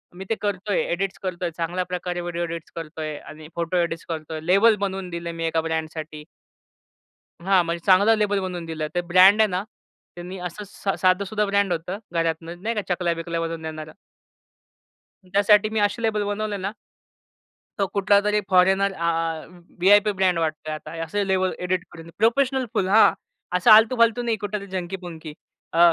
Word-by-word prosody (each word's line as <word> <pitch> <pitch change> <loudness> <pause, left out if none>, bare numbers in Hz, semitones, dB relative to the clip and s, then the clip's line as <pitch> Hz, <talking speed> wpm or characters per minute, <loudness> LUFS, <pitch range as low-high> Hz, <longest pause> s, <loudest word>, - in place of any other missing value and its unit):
मी 190 +2 -8
ते 225 - +1
करतोय. 205 0 -1
एडिट्स 190 +2 -2
करतोय, 180 -1 -2
चांगल्या 175 +2 -1
प्रकारे 180 -1 -4
व्हिडिओ 175 0 -3
एडिट्स 165 -1 -6
करतोय 155 -1 -5
आणि 155 +1 -11
फोटो 170 +1 -1
एडिट्स 170 -1 -1
करतोय. 160 -1 -5
लेबल 200 +6 +5
बनवून 190 -1 -4
दिलं 170 0 -5
मी 165 0 -3
1 165 0 +1
ब्रँडसाठी. 160 -1 -5 1.2
हां. 190 -1 +4
म्हणजे 170 0 -4
चांगलं 200 +4 +6
लेबल 205 -1 +1
बनवून 180 -2 -4
दिलं 160 -2 -4
ते 175 - +1
ब्रँड 190 +4 +7
आहे 220 - +6
ना? 185 +1 -2 0.5
त्यांनी 180 +2 -8
असं 210 +5 -9
स 200 0 -10
साधंसुद्धा 200 +3 +2
ब्रँड 200 -2 +1
होतं 175 +4 -3
घरातनं, 165 +1 -2
नाही 230 +2 -1
का 210 - -1
चकल्या-बिकल्या 170 -1 -2
बनवून 165 -1 -4
देणारं 155 -1 -7 1.4
त्यासाठी 205 +1 +4
मी 220 -1 0
असे 205 +3 0
लेबल 215 -2 +1
बनवले 205 0 -2
ना 195 0 -3 1.1
तो 195 - +2
कुठलातरी 205 +1 +2
फॉरेनर 190 +2 +4
आ 170 -2 -1 0.7
व्ही-आय-पी 205 +3 +5
ब्रँड 185 -2 +1
वाटतोय 155 -1 -2
आहे - - -2
आता. 165 +1 -7
असे 200 +5 -2
लेवल 185 -1 +1
एडिट 180 0 -1
करून 165 0 -11
प्रोफेशनल 255 +4 +2
फुल, 185 - +1
हां. 215 +3 +6 0.4
असं 180 +6 +4
आलतू-फालतू 230 +2 +6
नाही 230 -2 0
कुठं 205 +1 -4
तरी 200 - -9
झंकी-पुंकी 175 -4 -6 0.4
अ, 165 - -1
185 Hz, 165 wpm, -23 LUFS, 165-205 Hz, 1.4 s, ब्रँड